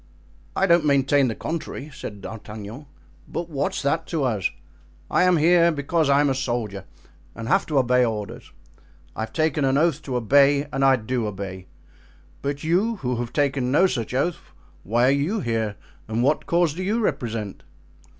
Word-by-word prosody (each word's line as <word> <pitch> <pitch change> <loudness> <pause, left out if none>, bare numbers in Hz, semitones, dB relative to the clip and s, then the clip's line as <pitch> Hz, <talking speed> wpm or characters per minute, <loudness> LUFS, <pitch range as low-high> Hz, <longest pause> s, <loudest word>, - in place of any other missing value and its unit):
"I 195 - +3
don't 170 -3 +4
maintain 140 -1 +3
the 115 - -2
contrary," 155 -3 -5
said 100 -5 -8
D'Artagnan. 110 +5 -8 0.4
"But 170 0 -5
what's 145 +1 -2
that 160 +4 0
to 160 -4 -1
us? 110 -7 0 0.6
I - - +3
am 180 -1 +4
here 170 +2 +5
because 155 +1 0
I 140 +1 +5
am 145 - +2
a - - +2
soldier 120 -7 -3 0.5
and 115 0 -6
have 195 +9 +2
to 150 - 0
obey 125 -1 +4
orders—I 80 -7 -8
have 110 - -3
taken 155 -2 +1
an 135 0 +2
oath 155 -1 +2
to 130 -4 -5
obey, 140 +4 +4
and 135 - 0
I 135 -1 +6
do 120 -1 -2
obey; 95 -2 -6 0.7
but 140 0 -3
you 190 +8 +1
who 125 -1 0
have 120 -1 -4
taken 135 -3 0
no 160 +7 +5
such 125 - -2
oath, 165 +6 0 0.4
why 115 +8 +1
are - - +5
you 150 +11 0
here 110 -5 -1 0.3
and 110 +2 -1
what 145 +4 +1
cause 170 -3 +2
do 180 - -6
you 205 +5 0
represent?" 115 - -2
135 Hz, 175 wpm, -23 LUFS, 115-155 Hz, 0.7 s, I